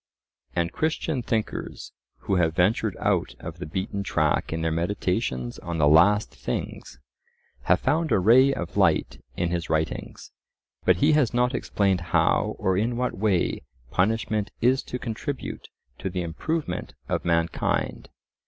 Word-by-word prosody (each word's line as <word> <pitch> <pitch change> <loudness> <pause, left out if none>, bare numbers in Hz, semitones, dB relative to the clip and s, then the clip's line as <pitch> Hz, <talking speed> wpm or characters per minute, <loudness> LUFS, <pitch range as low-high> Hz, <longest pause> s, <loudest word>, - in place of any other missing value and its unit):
And 85 0 0
Christian 155 -3 -1
thinkers, 110 -2 -3 0.3
who 95 - 0
have 80 -2 +2
ventured 100 +3 +1
out - - 0
of - - -8
the - - -5
beaten 95 +4 -3
track 80 -6 0
in 80 0 -2
their 80 - +1
meditations 85 - -1
on 85 0 -4
the 75 -2 +4
"last 100 +8 +5
things," - - -5 0.7
have - - +3
found 160 +1 +1
a - - +5
ray 120 +8 +6
of 85 -11 -4
light - - +2
in 85 -1 0
his 85 -1 -2
writings. 80 0 -3 0.5
But - - +5
he 145 +3 +3
has 150 -7 +2
not 125 +1 +2
explained 100 -6 0
how 85 - +1
or 95 0 +1
in 115 +5 0
what 125 0 -1
way 95 -3 +1 0.3
punishment 105 +1 0
is 130 +3 +3
to 125 - -4
contribute 125 +4 -5 0.3
to 95 - -3
the 90 -1 -3
improvement 90 - -3
of - - -1
mankind. 85 -1 0
95 Hz, 150 wpm, -25 LUFS, 85-120 Hz, 0.7 s, ray